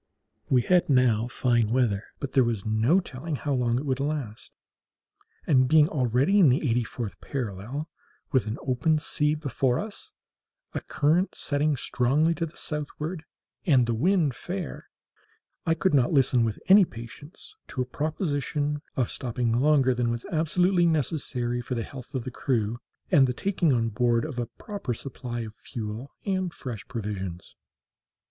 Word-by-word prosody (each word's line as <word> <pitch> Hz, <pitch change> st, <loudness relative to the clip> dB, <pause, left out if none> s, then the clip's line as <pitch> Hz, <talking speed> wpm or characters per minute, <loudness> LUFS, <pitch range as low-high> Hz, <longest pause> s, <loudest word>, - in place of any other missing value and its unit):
We 125 Hz, -2 st, +4 dB
had 180 Hz, -3 st, +3 dB
now 120 Hz, -4 st, +3 dB
fine 120 Hz, -2 st, +1 dB
weather, 115 Hz, -5 st, +1 dB
but 140 Hz, -, -4 dB
there 130 Hz, -, +4 dB
was 115 Hz, -3 st, -2 dB
no 110 Hz, -, +3 dB
telling 155 Hz, -2 st, -5 dB
how 145 Hz, +1 st, -2 dB
long 120 Hz, -2 st, +1 dB
it 135 Hz, -, -3 dB
would 130 Hz, -2 st, 0 dB
last; 135 Hz, -7 st, -3 dB, 0.9 s
and 130 Hz, -4 st, +4 dB
being 150 Hz, +2 st, +6 dB
already 135 Hz, -, +2 dB
in 170 Hz, -8 st, +7 dB
the 135 Hz, +4 st, +2 dB
eighty 120 Hz, 0 st, +2 dB
fourth 115 Hz, -2 st, -6 dB
parallel, 125 Hz, -, -4 dB, 0.4 s
with 130 Hz, -7 st, +2 dB
an 110 Hz, -, -3 dB
open 135 Hz, +5 st, +2 dB
sea 150 Hz, 0 st, 0 dB
before 135 Hz, -4 st, 0 dB
us, 220 Hz, -, -6 dB, 0.6 s
a -, -, -2 dB
current 160 Hz, +6 st, +1 dB
setting 145 Hz, 0 st, 0 dB
strongly 140 Hz, +7 st, +2 dB
to 165 Hz, 0 st, -2 dB
the 155 Hz, -, -15 dB
southward, 150 Hz, +2 st, -4 dB, 0.4 s
and 130 Hz, -6 st, +5 dB
the 120 Hz, -, 0 dB
wind 160 Hz, -, +2 dB
fair, 180 Hz, +5 st, -6 dB, 0.8 s
I 165 Hz, -, +3 dB
could 175 Hz, +1 st, +1 dB
not 130 Hz, -4 st, +4 dB
listen 130 Hz, -4 st, +4 dB
with 110 Hz, -2 st, -1 dB
any 195 Hz, +2 st, +8 dB
patience 145 Hz, -, -9 dB
to 130 Hz, -, -2 dB
a -, -, -8 dB
proposition 150 Hz, 0 st, -2 dB
of 125 Hz, -3 st, 0 dB
stopping 120 Hz, -1 st, -2 dB
longer 130 Hz, +1 st, +4 dB
than 120 Hz, -1 st, 0 dB
was 120 Hz, 0 st, -3 dB
absolutely 175 Hz, +2 st, +2 dB
necessary 130 Hz, -6 st, 0 dB
for 125 Hz, +1 st, -4 dB
the 115 Hz, -, -2 dB
health 130 Hz, +2 st, -10 dB
of 130 Hz, -, -1 dB
the 130 Hz, -, -5 dB
crew 120 Hz, -3 st, -1 dB, 0.3 s
and 135 Hz, -3 st, +6 dB
the 125 Hz, -, -1 dB
taking 180 Hz, +1 st, +1 dB
on 115 Hz, -3 st, +2 dB
board 115 Hz, +1 st, +1 dB
a 125 Hz, -6 st, -3 dB
proper 135 Hz, -, -5 dB
supply 120 Hz, -2 st, -6 dB
of 110 Hz, -2 st, -7 dB
fuel 110 Hz, +3 st, -6 dB, 0.2 s
and 185 Hz, -3 st, -1 dB
fresh 120 Hz, -6 st, -7 dB
provisions. 95 Hz, -6 st, -5 dB
130 Hz, 160 wpm, -27 LUFS, 120-155 Hz, 0.9 s, any